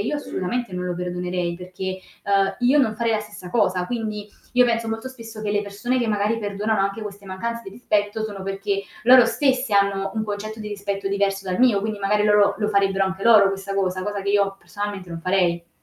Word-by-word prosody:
io 265 +9 -1
assolutamente 240 -4 -3
non 180 0 -3
lo 180 - -2
perdonerei 180 -1 -2
perché, 185 +1 -6 0.2
uhm, 195 -1 +2
io 255 +4 +4
non 220 -4 +1
farei 230 -1 +1
la 215 - +1
stessa 205 -4 -10
cosa, 185 -5 +1
quindi 215 -3 -4 0.3
io 250 0 +6
penso 230 -1 0
molto 225 +3 -3
spesso 225 -4 -10
che 205 -1 -1
le 205 0 +1
persone 205 +5 -2
che 235 - 0
magari 210 +2 +1
perdonano 205 +1 -1
anche 195 +3 -1
queste 200 -1 -8
mancanze 230 +5 -4
di - - -9
rispetto 210 -1 -1
sono 200 -3 -6
perché 195 +1 -2 0.2
loro 250 0 +8
stesse 255 0 +1
hanno 195 -1 +2
un 220 -1 -1
concetto 215 +1 -5
di 215 - -6
rispetto 200 -1 -4
diverso 195 -1 0
dal 185 +6 -1
mio, 240 -6 +5
quindi 210 0 -3
magari 210 +1 +2
loro 205 -1 +4
la 210 -1 0
farebbero 195 0 +1
anche 190 0 -4
loro 215 -3 +7
questa 195 0 -4
cosa, 185 -1 0
cosa 205 0 -3
che 200 - -1
io 200 -1 +2
personalmente 205 -4 -6
non 165 0 -6
farei. 175 -2 +1
205 Hz, 210 wpm, -23 LUFS, 195-220 Hz, 0.3 s, loro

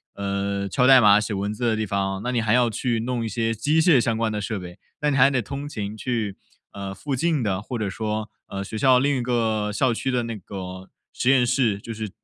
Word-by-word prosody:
嗯， 100 0 -2
敲 125 +7 +2
代 135 -1 +9
码 105 -2 +6
写 105 0 -3
文 100 +2 -2
字 120 +2 -3
的 115 -1 +2
地 110 0 -1
方， 95 -1 -2
那 125 - -1
你 120 -2 +1
还 110 +1 +1
要 120 -1 +4
去 115 +1 -1
弄 120 -1 -2
一 - - -2
些 115 +1 -1
机 145 +9 +1
械 160 -7 +5
相 115 -1 0
关 115 -1 0
的 105 -1 -3
设 105 +1 -3
备， 90 +1 -10 0.2
那 150 0 +2
你 - - 0
还 135 +2 +6
得 130 -3 0
通 140 +6 -6
勤 105 -4 -5
去 110 -4 -3 0.3
呃， 100 -1 -6
附 140 +5 -3
近 155 -2 0
的 95 -2 -1
或 120 +3 -5
者 105 -2 -2
说， 110 0 -3 0.2
呃， 100 0 -5
学 110 - -8
校 130 +2 +5
另 140 +1 +2
一 - - -1
个 110 -3 0
校 120 +4 +1
区 135 - -3
的 125 -2 0
那 115 -1 -4
个 95 -1 -8 0.2
实 125 - 0
验 130 -2 +5
室， 120 -5 +1
就 115 +2 -7
是 110 -1 -5
110 Hz, 270 characters per minute, -24 LUFS, 100-125 Hz, 0.3 s, 代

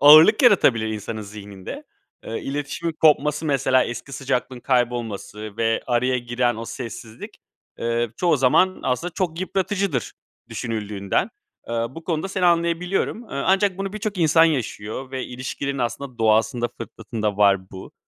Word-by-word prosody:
ağırlık 155 - +9
yaratabilir 135 - +5
insanın 110 +1 -4
zihninde. 100 -2 -9 0.4
Iıı, 115 - -4
iletişimin 145 +4 -3
kopması, 150 0 +3
mesela 130 -2 +3
eski 120 +3 -6
sıcaklığın 130 -2 -2
kaybolması 115 -4 -2
ve 115 -1 +1
araya 125 +1 +1
giren 120 -1 0
o 115 - -5
sessizlik, 115 -2 -8 0.4
ııı, 115 -1 0
çoğu 175 -3 +3
zaman 145 +8 +3
aslında 160 +7 -1
çok 175 -1 -2
yıpratıcıdır 190 - -1 0.4
düşünüldüğünden. 105 -4 -2 0.4
Iıı, 115 +2 -2
bu 165 - -9
konuda 165 +2 -1
seni 190 -1 -1
anlayabiliyorum. 175 +5 +1
Iıı, 140 -9 -4
ancak 195 0 +3
bunu 195 0 -3
birçok 215 -2 -4
insan 165 0 +5
yaşıyor 130 -4 -2
ve 130 -1 -3
ilişkilerin 135 +2 -4
aslında 125 +1 -3
doğasında, 115 +2 +2
fıtratında 110 -2 -4
var 100 -2 +3
bu. 95 0 -10
130 Hz, 135 wpm, -23 LUFS, 115-165 Hz, 0.4 s, ağırlık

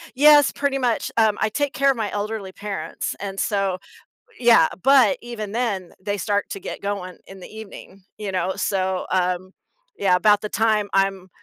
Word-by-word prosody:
Yes, 295 0 +6
pretty 280 -1 -1
much, 245 -3 -1
um, 220 -2 +3
I 215 - +2
take 285 +4 -2
care 275 0 +3
of 255 - -4
my 215 -3 -2
elderly 205 -2 -4
parents, 200 0 -5
and 195 -1 -5
so 195 -4 0 0.6
Yeah, 235 -2 +6 0.2
but 265 -6 +5
even 225 -4 -6
then, 205 -7 -2
they 205 +1 -2
start 205 +1 -1
to 195 - -5
get - - -7
going 200 -3 -5
in 195 0 -12
the - - -10
evening, 200 -3 -11
you 200 -3 -5
know? 185 +1 -1
So, 190 -2 -1
um, 185 0 -1 0.4
yeah, 185 -2 +3
about 205 +2 +4
the 210 - -4
time 215 -2 +1
I'm, 195 -1 0
205 Hz, 180 wpm, -22 LUFS, 190-225 Hz, 0.6 s, Yes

